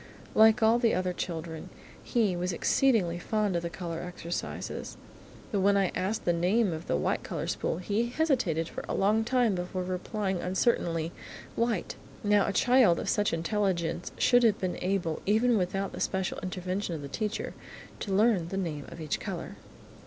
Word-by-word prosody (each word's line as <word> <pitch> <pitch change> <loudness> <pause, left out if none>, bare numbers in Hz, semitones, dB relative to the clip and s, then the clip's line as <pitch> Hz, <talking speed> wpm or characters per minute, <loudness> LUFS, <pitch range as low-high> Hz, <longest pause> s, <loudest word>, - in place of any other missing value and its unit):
Like 220 +1 +6
all 225 +2 +5
the 235 -2 +3
other 185 0 0
children, 165 -2 -5 0.3
he 220 -7 +1
was 180 +1 -1
exceedingly 180 -2 +2
fond 210 0 0
of 170 - +1
the 170 - -3
colour 170 -2 -5
exercises. 175 -1 -5 0.5
But 205 - +1
when 200 +1 +4
I 195 -2 +2
asked 210 +4 -2
the 175 - +3
name 185 +4 +2
of 160 +1 -7
the - - +1
white 75 - 0
colour - - -4
spool, - - -1
he 205 +6 0
hesitated 245 - +1
for - - -7
a - - -1
long 210 +3 +3
time 245 -2 +2
before 180 0 -3
replying 190 +1 -2
uncertainly 175 -4 0 0.4
"white." 230 -5 -1 0.3
Now 205 -1 +3
a - - +1
child 245 -5 +4
of - - -3
such 210 0 +2
intelligence 170 -1 -1
should 245 -1 +5
have 225 -4 +4
been 185 -1 -2
able, 180 -4 -1
even 225 +4 +4
without 195 0 -1
the - - -7
special 190 -1 -1
intervention 185 0 -3
of 150 - -6
the - - -5
teacher, 210 +9 -3 0.5
to 200 - -4
learn 200 -3 +3
the 190 - -4
name 155 -6 -3
of - - -10
each 155 -2 -2
colour. - - -6
190 Hz, 175 wpm, -29 LUFS, 175-220 Hz, 0.5 s, Like